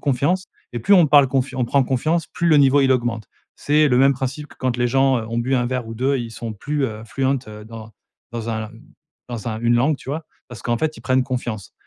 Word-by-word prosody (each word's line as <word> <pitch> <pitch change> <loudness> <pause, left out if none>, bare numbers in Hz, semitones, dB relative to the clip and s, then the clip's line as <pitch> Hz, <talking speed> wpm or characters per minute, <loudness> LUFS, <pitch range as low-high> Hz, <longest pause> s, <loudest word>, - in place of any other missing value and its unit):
confiance 145 +7 0 0.3
et 120 - -3
plus 160 - +4
on 175 -5 +6
parle 145 -1 +6
confian 130 0 -1
on 125 - +2
prend 140 +3 +3
confiance, 155 +6 0
plus 170 -1 -1
le 155 - +5
niveau, 140 0 +5
il 135 -1 +3
augmente. 120 -4 -1 0.3
C'est 150 +1 +3
le 125 -2 +3
même 135 +1 +5
principe 135 +3 -4
que - - -17
quand 130 -2 -1
les 120 0 +2
gens, 135 +1 +3
heu, 110 - -5
ont 115 +1 -2
bu 125 +3 0
1 125 -2 +1
verre 125 -1 -3
ou 115 - -7
2, 130 +4 +1
ils 120 -2 -5
sont 115 0 -6
plus, 145 +7 -2
heu, 110 -2 -7
fluent, 135 +4 -4 0.2
heu, 105 0 -10
dans 110 -1 -10 0.4
dans 115 -1 -5
un 110 -1 -4 0.6
dans 120 -3 -6
un 110 -1 -4
une 120 0 +2
langue, 140 +5 +2
tu - - -14
vois? 155 +3 -3 0.2
Parce 120 -2 -10
qu'en 120 -1 -1
fait, 155 +2 -1
ils - - -13
prennent 130 0 +2
confiance. 120 -6 -4
130 Hz, 255 wpm, -21 LUFS, 115-140 Hz, 0.6 s, on